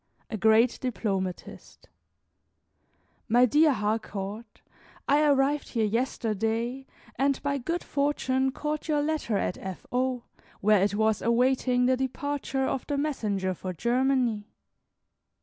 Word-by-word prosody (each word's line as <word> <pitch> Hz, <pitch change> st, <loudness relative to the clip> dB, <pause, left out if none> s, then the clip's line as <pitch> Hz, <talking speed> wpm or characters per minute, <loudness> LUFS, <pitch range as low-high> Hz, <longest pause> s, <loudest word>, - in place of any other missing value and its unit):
A -, -, -2 dB
GREAT 220 Hz, +3 st, +4 dB
DIPLOMATIST 195 Hz, -7 st, -4 dB, 1.4 s
My 245 Hz, +3 st, +6 dB
dear 300 Hz, +5 st, +4 dB
Harcourt, 210 Hz, -1 st, -4 dB, 0.4 s
I 290 Hz, +2 st, +4 dB
arrived 285 Hz, 0 st, +2 dB
here 225 Hz, -3 st, 0 dB
yesterday, 230 Hz, +2 st, -1 dB, 0.3 s
and 275 Hz, 0 st, +1 dB
by 280 Hz, -1 st, 0 dB
good 335 Hz, +7 st, -3 dB
fortune 265 Hz, -2 st, 0 dB
caught 300 Hz, +3 st, -4 dB
your 295 Hz, -2 st, +1 dB
letter 295 Hz, -8 st, -1 dB
at 180 Hz, -, -2 dB
F. 190 Hz, -2 st, -7 dB
O., 250 Hz, -1 st, 0 dB, 0.4 s
where 210 Hz, -1 st, +4 dB
it 200 Hz, +1 st, +1 dB
was 220 Hz, 0 st, +1 dB
awaiting 250 Hz, +1 st, +2 dB
the 255 Hz, 0 st, +3 dB
departure 270 Hz, +1 st, -2 dB
of 265 Hz, -, -3 dB
the 285 Hz, -, -1 dB
messenger 210 Hz, -10 st, -1 dB
for 185 Hz, +1 st, -6 dB
Germany. 240 Hz, -, +1 dB
250 Hz, 120 wpm, -27 LUFS, 215-275 Hz, 1.4 s, My